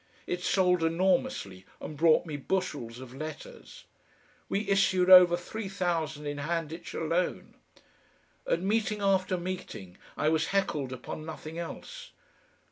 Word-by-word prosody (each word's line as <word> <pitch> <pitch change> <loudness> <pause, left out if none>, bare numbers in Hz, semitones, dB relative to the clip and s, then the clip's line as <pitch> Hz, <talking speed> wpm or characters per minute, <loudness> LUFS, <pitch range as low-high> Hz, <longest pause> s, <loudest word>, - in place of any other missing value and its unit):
It 180 - -3
sold 180 -1 +2
enormously 165 - 0 0.2
and 155 - -7
brought 160 +3 +4
me 155 -3 -5
bushels 145 -7 -3
of 130 -1 -10
letters. 155 - -9 0.6
We 200 +1 -1
issued 190 -2 +3
over 180 -2 +9
three 195 +3 -6
thousand 165 -6 -2
in 145 0 -4
Handitch 165 +2 -4
alone. 165 +3 -1 0.9
At 170 - 0
meeting 210 +1 0
after 190 -1 +2
meeting 175 - -6 0.2
I 155 - +2
was 160 +1 +1
heckled 155 -9 -1
upon 130 +4 -7
nothing 160 +1 -7
else. - - -8
170 Hz, 125 wpm, -29 LUFS, 155-190 Hz, 0.9 s, over